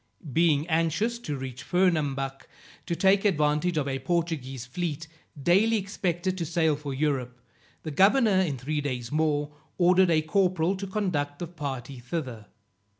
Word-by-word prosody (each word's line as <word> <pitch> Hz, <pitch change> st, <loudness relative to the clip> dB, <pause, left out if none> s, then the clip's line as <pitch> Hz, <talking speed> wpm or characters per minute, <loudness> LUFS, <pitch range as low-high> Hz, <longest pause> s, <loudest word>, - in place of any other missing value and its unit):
Being 155 Hz, -2 st, +3 dB
anxious 170 Hz, +8 st, 0 dB
to 150 Hz, -12 st, -4 dB
reach 130 Hz, -2 st, -6 dB
Fernambuc, 145 Hz, -7 st, 0 dB, 0.4 s
to 170 Hz, -, -1 dB
take 195 Hz, +3 st, +3 dB
advantage 155 Hz, -2 st, +1 dB
of 145 Hz, -2 st, 0 dB
a 135 Hz, -1 st, -2 dB
Portuguese 135 Hz, -5 st, -2 dB
fleet, 160 Hz, +4 st, -4 dB, 0.3 s
daily 200 Hz, +9 st, +3 dB
expected 185 Hz, -2 st, -2 dB
to -, -, -1 dB
sail 160 Hz, -2 st, +2 dB
for 145 Hz, -1 st, -6 dB
Europe, 130 Hz, -3 st, -1 dB, 0.4 s
the 155 Hz, -, -4 dB
governor, 200 Hz, -, +4 dB
in 150 Hz, -8 st, -1 dB
three 145 Hz, +4 st, -2 dB
days 125 Hz, -4 st, -4 dB
more, 150 Hz, -1 st, 0 dB, 0.3 s
ordered 185 Hz, +1 st, +5 dB
a 155 Hz, -2 st, +3 dB
corporal 185 Hz, +1 st, +1 dB
to 195 Hz, +1 st, -5 dB
conduct 175 Hz, -8 st, -2 dB
the 175 Hz, -, -4 dB
party 140 Hz, -6 st, -6 dB
thither. 120 Hz, -5 st, -5 dB
160 Hz, 150 wpm, -27 LUFS, 140-180 Hz, 0.4 s, ordered